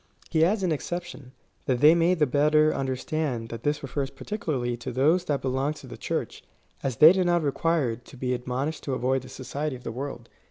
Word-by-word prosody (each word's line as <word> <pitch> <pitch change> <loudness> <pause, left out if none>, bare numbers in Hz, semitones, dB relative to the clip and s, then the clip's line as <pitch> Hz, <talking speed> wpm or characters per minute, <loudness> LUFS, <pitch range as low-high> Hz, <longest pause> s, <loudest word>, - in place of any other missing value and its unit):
He 160 -1 +3
adds 195 +4 +2
an 180 - +1
exception, 165 -3 -5 0.4
that 125 -2 +1
they 150 +4 +8
may 170 +2 +3
the 155 -3 +3
better 150 +3 +3
under 135 -1 -1
stand 130 -5 -3
tliat 115 -1 -6
this 150 +2 -1
refers 135 0 -3
particuhxrly 130 - -3
to 130 +2 -5
those 155 +9 +2
that 145 -4 -1
belong 135 +3 0
to 135 - -12
tlie 120 -2 -10
Church, - - -3 0.4
as 130 -3 -2
they 155 +3 +9
did 185 -2 +1
not 175 -1 +2
require 145 -3 +1
to 125 +3 -15
be 125 0 -1
admonished^ 130 +5 -3
to 135 - -2
avoid 130 +2 0
the 130 - -12
society 135 +3 -4
of 125 - -12
the 115 - -4
world. 125 -1 -6
140 Hz, 210 wpm, -26 LUFS, 125-155 Hz, 0.4 s, they